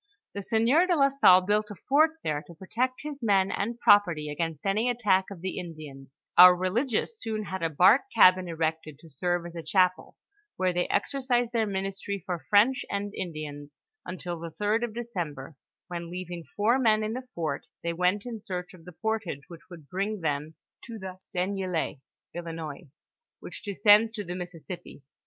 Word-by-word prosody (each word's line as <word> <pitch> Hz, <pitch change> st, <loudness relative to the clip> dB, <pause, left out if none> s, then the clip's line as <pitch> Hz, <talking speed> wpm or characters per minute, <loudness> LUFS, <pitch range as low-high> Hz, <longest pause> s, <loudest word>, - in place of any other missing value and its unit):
The 200 Hz, -, -4 dB
sieur 235 Hz, -, +3 dB
de 355 Hz, -, +3 dB
la 275 Hz, -3 st, +4 dB
Salle 270 Hz, -10 st, +6 dB
built 210 Hz, +2 st, +1 dB
u 205 Hz, -, -7 dB
fort 300 Hz, +4 st, +5 dB
there 150 Hz, -1 st, -1 dB
to 170 Hz, -, -12 dB
protect 245 Hz, +9 st, -2 dB
his 295 Hz, -2 st, -7 dB
men 195 Hz, -4 st, +2 dB
and 230 Hz, +4 st, -3 dB
property 170 Hz, -9 st, +4 dB
against 160 Hz, +1 st, -4 dB
any 215 Hz, +5 st, +1 dB
attack 210 Hz, -6 st, +2 dB
of 195 Hz, -4 st, -10 dB
the 190 Hz, +1 st, -4 dB
Indian;); 155 Hz, -6 st, -9 dB, 0.3 s
our 180 Hz, 0 st, +11 dB
religious 225 Hz, -, -1 dB
soon 215 Hz, -1 st, -3 dB
had 190 Hz, -2 st, -5 dB
a 165 Hz, -, +1 dB
bark 185 Hz, -, +5 dB
cabin 185 Hz, 0 st, +6 dB
erected 160 Hz, -2 st, -3 dB
to 160 Hz, +1 st, -12 dB
serve 175 Hz, +5 st, -1 dB
as 175 Hz, 0 st, -9 dB
a 165 Hz, -, -4 dB
chapel, 180 Hz, +3 st, +1 dB, 0.4 s
where 185 Hz, -1 st, +1 dB
they 175 Hz, 0 st, 0 dB
exercised 250 Hz, -4 st, 0 dB
their 225 Hz, -2 st, +1 dB
ministry 195 Hz, -1 st, -4 dB
for 170 Hz, -7 st, -5 dB
French 225 Hz, +6 st, +4 dB
and 200 Hz, 0 st, -3 dB
Indians 150 Hz, -5 st, -7 dB, 0.3 s
until 180 Hz, -2 st, -5 dB
the 170 Hz, 0 st, -6 dB
third 210 Hz, +6 st, 0 dB
of 230 Hz, -2 st, -4 dB
December, 170 Hz, -, -5 dB, 0.3 s
when 170 Hz, -2 st, -6 dB
leaving 175 Hz, -1 st, -6 dB
four 225 Hz, +5 st, +3 dB
men 215 Hz, -3 st, +3 dB
in 215 Hz, +1 st, -2 dB
the 255 Hz, +1 st, -6 dB
fort, 165 Hz, -2 st, -3 dB, 0.2 s
they 170 Hz, 0 st, -1 dB
went 180 Hz, +5 st, +1 dB
in 235 Hz, -3 st, -6 dB
search 180 Hz, -3 st, -6 dB
of 170 Hz, -3 st, -16 dB
the 180 Hz, -, -10 dB
portage 215 Hz, -10 st, -2 dB
which 170 Hz, -2 st, -11 dB
would 165 Hz, -5 st, -12 dB
bring 195 Hz, +5 st, -3 dB
them 150 Hz, 0 st, -2 dB, 0.3 s
to 230 Hz, -1 st, -8 dB
the 190 Hz, -2 st, -8 dB
Seignelay 185 Hz, -5 st, -2 dB, 0.4 s
(Ilinois), 165 Hz, -4 st, -6 dB, 0.5 s
which -, -, -9 dB
descends 210 Hz, +2 st, +4 dB
to 210 Hz, -2 st, -4 dB
the 175 Hz, -1 st, -6 dB
Missisipi. 180 Hz, -4 st, -8 dB
185 Hz, 180 wpm, -27 LUFS, 170-215 Hz, 0.5 s, our